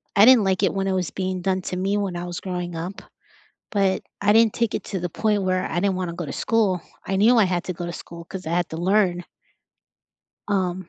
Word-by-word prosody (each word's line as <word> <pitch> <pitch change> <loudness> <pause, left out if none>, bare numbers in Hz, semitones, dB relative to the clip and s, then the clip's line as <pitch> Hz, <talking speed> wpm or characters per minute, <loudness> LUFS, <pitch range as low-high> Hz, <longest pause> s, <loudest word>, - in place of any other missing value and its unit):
I 205 0 +8
didn't 250 -3 +7
like 190 0 +1
it 195 - +2
when 195 0 -1
it 190 - +1
was 185 -3 -1
being 185 -1 -3
done 190 0 0
to 180 - -4
me 195 +2 0
when 195 -4 -2
I 175 - -4
was 175 0 -5
growing 180 -2 -4
up, 175 +5 -5 0.7
but 195 -2 +1 0.2
I 205 +1 +5
didn't 225 0 +5
take 230 -2 0
it - - -3
to 190 - -3
the 175 - -2
point 210 0 0
where 185 0 0
I 175 - 0
didn't 195 -1 +1
wanna 180 -2 -3
go 175 - -4
to - - -5
school. 205 -6 +1 0.3
I 195 - 0
knew 225 +5 +5
I 215 - +6
had 180 -1 -1
to 185 - -3
go 175 - -5
to 170 - -4
school 170 -1 -9
'cause 185 -1 -8
I - - -2
had 175 0 +1
to 160 - -5
learn. 180 -1 +2 1.2
Um, 185 -3 -1
185 Hz, 250 wpm, -23 LUFS, 175-200 Hz, 1.2 s, I